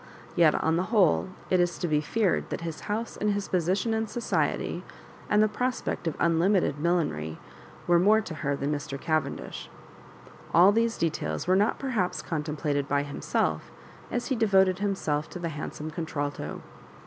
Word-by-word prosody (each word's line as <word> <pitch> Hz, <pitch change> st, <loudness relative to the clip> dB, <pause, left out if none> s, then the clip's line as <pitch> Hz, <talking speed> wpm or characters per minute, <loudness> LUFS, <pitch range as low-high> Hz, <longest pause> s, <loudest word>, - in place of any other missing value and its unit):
Yet, 165 Hz, -3 st, +5 dB
on 160 Hz, +1 st, +1 dB
the 180 Hz, -, 0 dB
whole, 195 Hz, -5 st, +3 dB, 0.2 s
it 185 Hz, -, +4 dB
is 175 Hz, -1 st, +1 dB
to 175 Hz, -, -2 dB
be 150 Hz, -2 st, +2 dB
feared 200 Hz, +4 st, 0 dB
that -, -, -4 dB
his 165 Hz, -2 st, -5 dB
house 225 Hz, +3 st, -2 dB
and 210 Hz, 0 st, +1 dB
his 200 Hz, -1 st, -3 dB
position 185 Hz, +6 st, +1 dB
in 220 Hz, 0 st, 0 dB
society, 240 Hz, +2 st, -1 dB, 0.5 s
and 210 Hz, 0 st, +5 dB
the -, -, +4 dB
prospect 250 Hz, -4 st, -2 dB
of 160 Hz, -, -1 dB
unlimited 170 Hz, -2 st, +2 dB
millinery, 145 Hz, -, 0 dB, 0.5 s
were 175 Hz, -1 st, +4 dB
more 210 Hz, +5 st, +5 dB
to 190 Hz, -6 st, -5 dB
her 145 Hz, -2 st, -1 dB
than 140 Hz, +1 st, -2 dB
Mr. 145 Hz, -1 st, -4 dB
Cavendish. 155 Hz, +2 st, -2 dB, 0.9 s
All 180 Hz, +4 st, +8 dB
these 230 Hz, +2 st, +1 dB
details 165 Hz, -2 st, -1 dB
were 185 Hz, +1 st, +3 dB
not 205 Hz, +3 st, +2 dB
perhaps 205 Hz, -10 st, -1 dB
contemplated 150 Hz, -2 st, -2 dB
by 145 Hz, 0 st, +1 dB
himself 145 Hz, 0 st, -2 dB, 0.4 s
as 245 Hz, -, -2 dB
he 265 Hz, -, +1 dB
devoted 190 Hz, -5 st, +3 dB
himself 160 Hz, -7 st, -1 dB
to -, -, -7 dB
the 170 Hz, -1 st, -3 dB
handsome 155 Hz, 0 st, -6 dB
contralto. 145 Hz, -3 st, -4 dB
175 Hz, 165 wpm, -27 LUFS, 155-205 Hz, 0.9 s, All